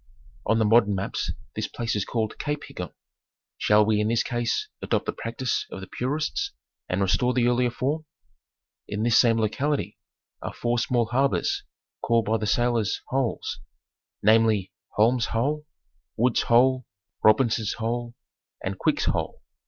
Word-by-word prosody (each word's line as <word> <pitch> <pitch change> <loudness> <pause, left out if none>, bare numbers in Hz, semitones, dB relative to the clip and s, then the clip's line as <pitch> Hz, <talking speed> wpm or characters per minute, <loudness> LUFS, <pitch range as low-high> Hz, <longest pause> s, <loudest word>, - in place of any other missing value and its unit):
On 115 - +3
the 110 - +3
modern 105 -2 +4
maps 95 +1 -2 0.2
this - - -2
place 115 -2 -3
is 105 - 0
called 110 -2 -2
Cape 150 0 -2
Higgon. 90 -5 -7 0.7
Shall 105 0 +5
we 105 -1 +2
in 105 - +1
this 115 +1 +2
case 120 -1 -1
adopt - - 0
the - - -1
practice 120 +2 -2
of - - -7
the 95 - -7
purists 155 - -2 0.4
and 90 +2 0
restore 125 +6 +2
the 125 -2 +3
earlier 125 0 +2
form? 145 +6 -2 0.8
In 105 +1 -2
this 115 -1 +5
same 115 -2 +4
locality 135 +7 -1 0.4
are - - -5
four 120 0 0
small 120 0 +1
harbors, 130 +4 +1 0.4
called 115 -2 +2
by 110 +2 +2
the 110 -1 -3
sailors 120 -1 +1
Holes; 130 -3 -1 0.6
namely 110 -3 +4 0.2
Holmes' 115 +2 +3
Hole, 150 +6 -1 0.5
Wood's 120 +1 +3
Hole, 130 +1 +3 0.4
Robinson's 110 -1 +3
Hole, 120 +1 -3 0.5
and - - -3
Quick's - - +1
Hole. - - -2
115 Hz, 150 wpm, -25 LUFS, 110-125 Hz, 0.8 s, Shall